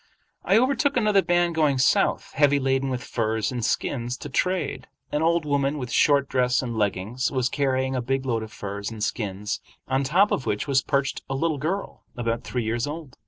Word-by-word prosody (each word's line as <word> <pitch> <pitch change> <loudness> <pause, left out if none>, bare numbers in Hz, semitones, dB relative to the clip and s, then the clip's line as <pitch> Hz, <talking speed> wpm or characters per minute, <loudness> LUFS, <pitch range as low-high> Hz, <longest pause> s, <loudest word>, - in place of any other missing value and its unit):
I - - +4
overtook 275 +3 +2
another 210 -4 +4
band 175 -1 +2
going 150 -4 +2
south, 130 - +2
heavy 145 0 +4
laden 135 0 +1
with 125 -1 -3
furs 110 -1 -1
and 120 -2 -3
skins 120 +2 -1
to - - -8
trade. 180 -5 -1 0.2
An 150 - 0
old 165 0 +2
woman, 140 0 +1
with 125 -3 -5
short 140 -2 +4
dress 125 -1 +1
and 120 -2 -4
leggings, 105 +4 -1
was 130 -3 0
carrying 130 -1 0
a 125 - 0
big 135 +2 -1
load 115 -3 0
of 110 0 -7
furs 100 0 -5
and 110 -2 -6
skins, 105 -1 -3 0.3
on 130 +1 +1
top 180 +9 +3
of 135 - -1
which 105 +7 -1
was 135 -2 +3
perched 140 0 -1
a 135 - -1
little 155 +1 0
girl 185 +8 -3 0.2
about 115 -1 -1
three 125 -2 -2
years 115 +4 -1
old. 150 -3 -7
135 Hz, 200 wpm, -25 LUFS, 120-150 Hz, 0.3 s, I